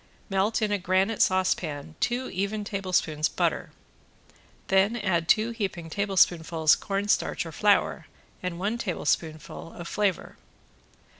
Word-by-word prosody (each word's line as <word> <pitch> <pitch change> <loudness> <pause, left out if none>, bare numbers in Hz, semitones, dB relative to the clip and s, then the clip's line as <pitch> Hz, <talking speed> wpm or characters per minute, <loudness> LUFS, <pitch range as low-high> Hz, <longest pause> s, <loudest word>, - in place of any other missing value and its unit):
Melt 200 +4 +1
in 210 - 0
a 205 - +1
granite 190 +4 +1
saucepan 165 -5 +1
two 245 +1 0
even 200 +3 -2
tablespoons 185 -6 0
butter, - - -1 1.0
then 195 +4 +3
add 175 -7 0
two 220 +5 +3
heaping 190 -7 -4
tablespoonfuls 170 -5 +3
cornstarch 200 +1 -1
or - - -7
flour, - - +2 0.3
and 180 -2 -4
one 205 +6 -2
tablespoon 165 -6 -1
of 170 +1 -9
flavor. 200 -2 -1
190 Hz, 120 wpm, -27 LUFS, 170-205 Hz, 1.0 s, then